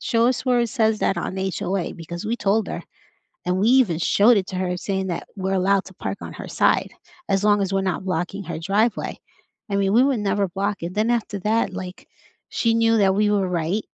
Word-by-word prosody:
"Show 230 0 +2
us 250 0 0
where 250 -2 +3
it 235 - +1
says 220 -3 +1
that 195 - +1
on 180 +2 -3
HOA," 190 -1 -2
because 170 +3 -7
we 225 +2 -1
told 205 0 +1
her, - - -5 0.6
and 180 +1 0
we 200 - +2
even 235 -12 +4
showed 215 +6 +4
it 190 -2 0
to 185 - -5
her 180 -1 -1
saying 190 +1 -2
that 170 -2 -4
we're 190 0 -1
allowed 195 +1 +2
to 190 - -12
park 200 - -5
on - - -7
her - - -8
side - - +1 0.4
as 195 0 +1
long 205 -1 +4
as 195 -1 -1
we're 195 - +2
not 190 0 -2
blocking 185 +2 -3
her 170 - -5
driveway. 205 +7 0 0.5
I - - -1
mean, 195 0 +1
we 245 +4 +5
would 270 -5 +1
never 200 0 +1
block 200 +3 -2
it. 175 - -5
Then 215 +3 +1
after 215 -4 -1
that, 220 +2 +1
like, 185 -1 -7 0.4
she 230 -1 +1
knew 225 0 +3
that 195 -2 +4
we 210 0 +3
were 195 -3 +1
right 175 +4 -1
195 Hz, 230 wpm, -22 LUFS, 185-220 Hz, 0.6 s, we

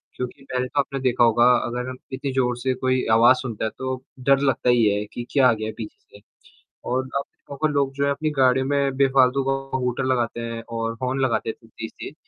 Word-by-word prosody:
क्योंकि 125 +2 -6
पहले 125 -1 -2
तो 140 - -2
आपने 140 0 -1
देखा 125 -2 +2
होगा 120 +1 +4 0.2
अगर 125 +1 -4
हम 130 - -7 0.2
इतनी 135 +1 -3
ज़ोर 125 -2 +1
से 130 +1 -1
कोई 130 0 0
आवाज़ 120 +3 +6
सुनता 115 -4 -4
है - - 0
तो 130 0 -2 0.2
डर 135 +1 +3
लगता 135 -3 +1
ही 120 -2 +4
है 105 0 +1
कि 120 - -5
क्या 135 -3 +5
आ - - +4
गया 110 0 -4
है 110 - -5
पीछे 105 -2 -10
से - - -20 0.7
और 130 +1 -1
आप 140 - -5 0.4
लोग 140 -2 0
जो 140 0 -1
है 140 - +2
अपनी 155 +2 -1
गाड़ियों 130 0 +3
में 140 -1 0
बेफालतू 135 -1 +3
का - - +3 0.3
हूटर 125 0 -1
लगाते 120 -2 0
हैं 115 0 -5
और 115 0 -2
हॉर्न 130 +1 -1
लगाते 120 -3 0
हैं 115 - -11
तेज़-तेज़। 110 0 -8
130 Hz, 220 wpm, -23 LUFS, 120-135 Hz, 0.7 s, आवाज़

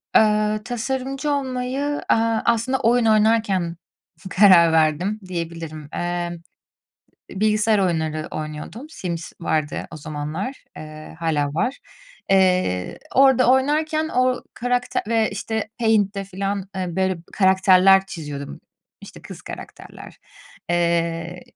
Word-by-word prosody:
Eee, 215 0 +3
tasarımcı 265 +4 -3
olmayı, 270 +1 -2
eee, - - +5 0.3
aslında 235 +3 +1
oyun 240 +1 +3
oynarken 215 -5 +2 0.5
karar 180 -4 +6
verdim 160 +6 +1
diyebilirim. 165 -4 -6
Eee, 175 0 -3 0.9
bilgisayar 215 +2 +2
oyunları 160 -4 -1
oynuyordum, 155 - -6
Sims 170 - -5
vardı 155 -3 -1
o - - -8
zamanlar, 155 - -5
eee, 155 0 -10
hâlâ 155 -3 0
var. 250 - -1 0.5
Eee, 185 - +2 0.2
orada 265 -2 +5
oynarken, 310 +4 +1
o 255 -2 +1
karakte 245 0 -1
ve, 225 -1 +2
işte, 220 -1 -3
Paint'te 205 -4 +1
falan, 195 0 -4
eee, 185 -1 -2
böyle 190 -2 0
karakterler 190 0 +5
çiziyordum, 145 -5 -7 0.4
işte, - - -13
kız - - -10
karakterler. - - -11 0.5
Eee, 170 0 0
195 Hz, 105 wpm, -22 LUFS, 170-235 Hz, 0.9 s, karar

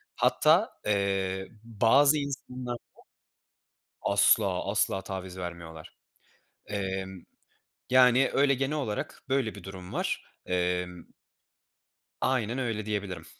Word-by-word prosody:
Hatta, - - +4 0.2
eee, 95 -2 0 0.2
bazı 120 +6 +4
insanlarda 130 -3 -4 1.2
Asla 100 -2 +3
asla 100 -1 +1
taviz 95 -1 -6
vermiyorlar. 85 -3 -8 0.7
Emm, 95 -2 -4 0.7
yani, 130 +1 +6
öyle 140 0 +4
genel 135 +3 -1
olarak 110 -8 -4
böyle 130 -5 0
bir 100 - -11
durum 95 -1 -9
var. - - -1 0.2
Emm 90 -1 -1 1.2
Aynen 125 -2 0
öyle, 115 -5 -2
diyebilirim. 100 -6 -3
100 Hz, 95 wpm, -28 LUFS, 95-125 Hz, 1.2 s, yani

